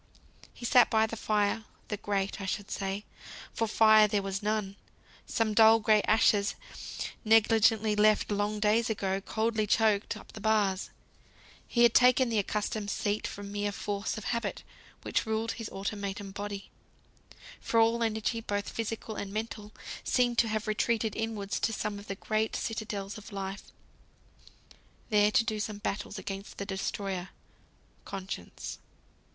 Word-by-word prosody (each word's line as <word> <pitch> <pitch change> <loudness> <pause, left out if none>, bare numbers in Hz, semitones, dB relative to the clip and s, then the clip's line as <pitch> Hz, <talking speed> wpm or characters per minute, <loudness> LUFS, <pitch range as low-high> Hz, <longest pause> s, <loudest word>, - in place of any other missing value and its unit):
He 240 - -9
sat 245 0 +6
by 220 0 +4
the 220 - -5
fire; 215 0 0 0.3
the 210 - -2
grate 200 -1 -2
I 195 - -4
should 200 +1 -3
say, 195 +1 -3 0.5
for 225 - 0
fire 215 0 +6
there 205 -1 0
was 195 0 -3
none. 210 -2 -1 0.5
Some 225 -2 0
dull, 225 +1 +7
gray 215 -1 +4
ashes, 210 -1 +3 0.7
negligently 220 -1 +4
left, 215 0 +3
long 205 +1 0
days 215 +2 +2
ago, 195 -3 -1
coldly 220 +1 0
choked 215 -1 +2
up - - -13
the 215 - -10
bars. 205 -3 +1 0.8
He 240 - +3
had 235 -1 +6
taken 250 0 +5
the 225 -2 +2
accustomed 210 +1 -2
seat 205 +1 -1
from 200 0 -7
mere 205 0 -1
force 200 +1 -3
of 215 - -6
habit, 235 +1 -2 0.4
which - - -1
ruled 220 +1 0
his 225 -3 -6
automaton 200 0 -4
body. 200 0 -6 0.9
For 230 - +1
all 230 +1 +3
energy, 225 +1 0
both 205 -2 -2
physical 225 -1 -4
and 200 -1 -5
mental, 215 0 -5 0.3
seemed 245 -2 +2
to 230 - +4
have 215 -1 -2
retreated 220 0 0
inwards 220 -3 -2
to - - +1
some 210 -1 -3
of 200 - -12
the 195 - -3
great 215 +2 -1
citadels 210 -2 -4
of 210 - -12
life, 195 0 -5 1.5
there 210 0 +5
to 220 - +3
do 215 -1 -2
battle 205 0 -4
against 195 0 -6
the 200 - -4
Destroyer, 190 -1 -3 0.7
Conscience. 195 -1 -6
210 Hz, 150 wpm, -30 LUFS, 200-220 Hz, 1.5 s, dull